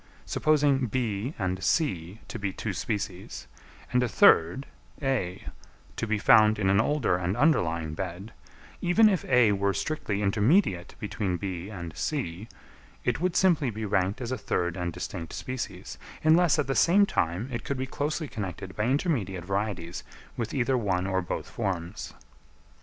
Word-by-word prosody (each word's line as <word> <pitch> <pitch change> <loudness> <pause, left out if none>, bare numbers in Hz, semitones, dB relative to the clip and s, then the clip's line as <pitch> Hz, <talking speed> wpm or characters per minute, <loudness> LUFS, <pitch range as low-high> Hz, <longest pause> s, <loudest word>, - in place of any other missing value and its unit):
Supposing 145 -4 +2
B 115 +2 -2
and 95 -1 -2
C 95 - 0
to 115 - -6
be 100 -2 -2
two - - -4
species, 95 -3 -4 0.5
and 125 - +4
a 125 - +1
third, 85 +12 +5 0.3
A, 120 -10 -2 0.5
to 115 - -3
be 110 0 +1
found 110 +1 +6
in 95 -2 +2
an 100 +2 +4
older 130 -8 +1
and 90 +4 -2
underlying 85 - +2
bed; 95 +5 -6 0.5
even 195 +6 +5
if 195 -4 +1
A 125 -4 +5
were 100 -1 +1
strictly 105 -10 -2
intermediate 105 - +2
between 100 -3 -2
B 95 -1 -5
and 85 -6 -7
C, 110 - -3 0.6
it - - 0
would 180 -1 0
simply 165 -8 +3
be 110 0 -4
ranked 95 +3 0
as 120 0 -4
a 130 - -2
third 85 -1 -1
and 90 -2 -2
distinct 85 -1 -6
species, 130 -1 -6 0.2
unless 165 +1 +5
at 150 - +1
the 135 - -1
same 195 +8 +5
time 90 - -1
it 120 -2 -4
could 140 - -3
be 130 - -2
closely 150 +3 -2
connected 95 -4 -6
by 105 - 0
intermediate 120 - 0
varieties 95 -3 -3 0.3
with 115 -2 -3
either 130 -1 +1
one 95 -4 0
or 95 -1 0
both 90 - -4
forms. 90 +2 -4
105 Hz, 160 wpm, -27 LUFS, 95-135 Hz, 0.6 s, found